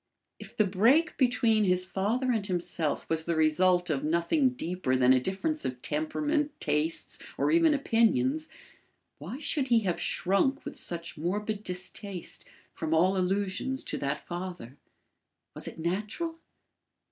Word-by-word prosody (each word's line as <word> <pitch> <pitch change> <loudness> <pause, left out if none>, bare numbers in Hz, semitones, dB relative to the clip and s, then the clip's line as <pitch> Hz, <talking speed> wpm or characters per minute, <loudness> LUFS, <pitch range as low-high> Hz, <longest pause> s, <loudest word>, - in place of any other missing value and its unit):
If - - -12
the 215 - +4
break 235 - +3
between 235 -4 +3
his 180 -1 +2
father 225 +8 0
and 215 -4 -1
himself 170 -4 -2
was 160 0 -1
the 170 - 0
result 175 +3 +3
of 140 -3 -1
nothing 170 - +2
deeper 180 - -2
than 130 0 +5
a 130 - +4
difference 200 - -2
of 125 -1 -3
temperament, 300 -1 0
tastes 150 +2 -1 0.2
or - - +2
even 325 -2 +5
opinions, 265 +4 +2 0.7
why 255 - -6
should 285 -2 -1
he 235 -2 +4
have 185 -5 -1
shrunk 230 +10 +1
with 290 - -6
such 170 -2 -5
morbid 205 +5 -2
distaste 185 0 -7 0.3
from 160 0 -1
all 185 +4 +4
allusions 195 +7 -1
to - - -4
that 140 +1 -3
father? 175 -8 -6 0.8
Was - - -9
it - - -7
natural? 210 - -3
190 Hz, 145 wpm, -29 LUFS, 170-260 Hz, 0.8 s, than